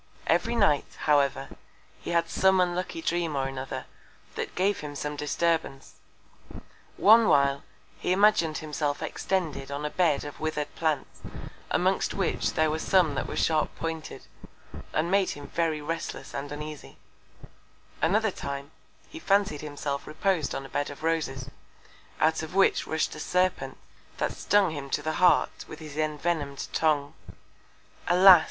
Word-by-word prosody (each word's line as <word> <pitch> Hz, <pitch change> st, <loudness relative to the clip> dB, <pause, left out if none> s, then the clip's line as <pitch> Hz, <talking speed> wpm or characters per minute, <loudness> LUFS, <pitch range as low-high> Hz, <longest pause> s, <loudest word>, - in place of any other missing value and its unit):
Every 175 Hz, +8 st, +1 dB
Night, 200 Hz, -11 st, +2 dB
however, 145 Hz, -3 st, +2 dB, 0.5 s
he -, -, -8 dB
had 170 Hz, -1 st, +2 dB
some 190 Hz, 0 st, +3 dB
unlucky 180 Hz, -, -1 dB
Dream 170 Hz, -, 0 dB
or 135 Hz, -1 st, 0 dB
another, 135 Hz, 0 st, -5 dB, 0.5 s
that -, -, -5 dB
gave 195 Hz, +2 st, +1 dB
him 145 Hz, -1 st, -7 dB
some 150 Hz, +1 st, -4 dB
Disturbance. 150 Hz, -1 st, -1 dB, 1.0 s
One 220 Hz, +2 st, +7 dB
while, 140 Hz, 0 st, +3 dB, 0.4 s
he -, -, -1 dB
imagin'd 190 Hz, -5 st, +3 dB
himself 150 Hz, -1 st, -2 dB
extended 160 Hz, -8 st, -2 dB
on 140 Hz, +1 st, -4 dB
a 150 Hz, -, -2 dB
Bed 170 Hz, -6 st, +2 dB
of 145 Hz, -, -8 dB
wither'd 155 Hz, -1 st, -3 dB
Plants, 155 Hz, -4 st, -2 dB, 0.5 s
amongst -, -, +1 dB
which -, -, 0 dB
there 155 Hz, -1 st, +2 dB
were 160 Hz, -, -2 dB
some 175 Hz, -3 st, +3 dB
that 135 Hz, -, -2 dB
were -, -, -5 dB
sharp 155 Hz, -1 st, +1 dB
pointed, 160 Hz, -1 st, -5 dB, 0.7 s
and 165 Hz, +3 st, 0 dB
made 195 Hz, -1 st, +3 dB
him 145 Hz, -, -9 dB
very 160 Hz, -1 st, -1 dB
restless 165 Hz, +2 st, -5 dB
and 140 Hz, +1 st, -5 dB
uneasy; 150 Hz, 0 st, -8 dB, 1.0 s
another 215 Hz, +4 st, +2 dB
Time, 140 Hz, -3 st, -6 dB, 0.4 s
he 325 Hz, -, -10 dB
fancied 200 Hz, -, +1 dB
himself 145 Hz, -1 st, -4 dB
repos'd 160 Hz, 0 st, 0 dB
on 135 Hz, -, -4 dB
a -, -, -10 dB
Bed 145 Hz, -, -2 dB
of 145 Hz, +2 st, -10 dB
Roses, 135 Hz, -5 st, -1 dB, 0.7 s
out 160 Hz, 0 st, +2 dB
of 160 Hz, +3 st, -7 dB
which 195 Hz, -, +3 dB
rush'd 160 Hz, 0 st, -1 dB
a -, -, -8 dB
Serpent, 185 Hz, 0 st, 0 dB, 0.4 s
that -, -, 0 dB
stung 205 Hz, -4 st, +3 dB
him 140 Hz, -3 st, -6 dB
to 145 Hz, -, -1 dB
the 155 Hz, +1 st, -2 dB
Heart 180 Hz, -4 st, +3 dB
with 155 Hz, -, -9 dB
his 150 Hz, -2 st, -10 dB
envenom'd 155 Hz, -2 st, -2 dB
Tongue. 150 Hz, -3 st, +1 dB, 0.9 s
Alas! 180 Hz, +1 st, +9 dB
155 Hz, 150 wpm, -27 LUFS, 145-180 Hz, 1.0 s, Alas